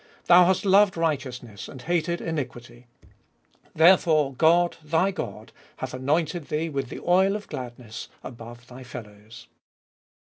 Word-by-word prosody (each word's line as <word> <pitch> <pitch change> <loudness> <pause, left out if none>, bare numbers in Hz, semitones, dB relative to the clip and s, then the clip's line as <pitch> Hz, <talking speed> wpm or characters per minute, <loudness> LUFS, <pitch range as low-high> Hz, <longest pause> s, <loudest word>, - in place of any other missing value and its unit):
9. - - -28 0.3
Thou - - +6
hast 190 +2 +1
loved 195 -1 +4
righteousness, 130 -9 -3
and 130 - -11
hated 170 0 -1
iniquity; 120 -6 -6 0.9
Therefore 160 -4 +4
God, 170 +5 +3
thy 160 +5 +1
God, 185 - -7 0.3
hath - - -6
anointed 155 +5 -1
thee 155 +2 -2
With 135 -4 -3
the - - -8
oil 190 +3 +3
of 210 -1 -6
gladness 120 -3 -8
above 120 -1 -10
thy 125 +1 -12
fellows 115 -1 -11
(Ps. - - -33
150 Hz, 140 wpm, -25 LUFS, 120-175 Hz, 0.9 s, Thou